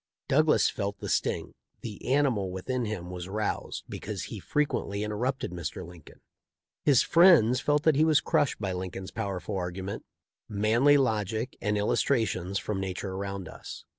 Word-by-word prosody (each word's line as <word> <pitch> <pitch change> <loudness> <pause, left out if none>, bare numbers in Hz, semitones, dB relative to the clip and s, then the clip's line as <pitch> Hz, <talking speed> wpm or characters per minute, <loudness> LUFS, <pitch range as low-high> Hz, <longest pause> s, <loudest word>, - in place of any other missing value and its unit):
Douglas 155 +3 +4
felt 100 -1 -3
the - - -6
sting; - - -1 0.3
the 105 -4 -7
animal 130 -9 +2
within 120 +7 -2
him 90 -5 -5
was 90 0 -6
roused 105 +2 -3
be - - -6
cause - - -5
he - - -6
frequently 105 -8 -1
interrupted 120 +3 -2
Mr. 85 -1 -5
Lincoln. 85 -2 -14 0.6
His 140 -5 +5
friends 165 - +6
felt 145 +3 +1
that 160 -3 +4
he 150 - +4
was 155 -2 +5
crushed 145 - +1
by 95 -3 -2
Lincoln's 95 +1 -5
pow 110 -3 -3
erful 95 +1 -4
argument, 95 +2 -4 0.5
manly 115 +7 +4
logic, 110 -1 0
and 105 0 0
illustrations 105 -3 +1
from 100 0 -3
nature 95 +1 -4
around 100 -1 -4
us. - - -9
105 Hz, 160 wpm, -28 LUFS, 95-130 Hz, 0.6 s, friends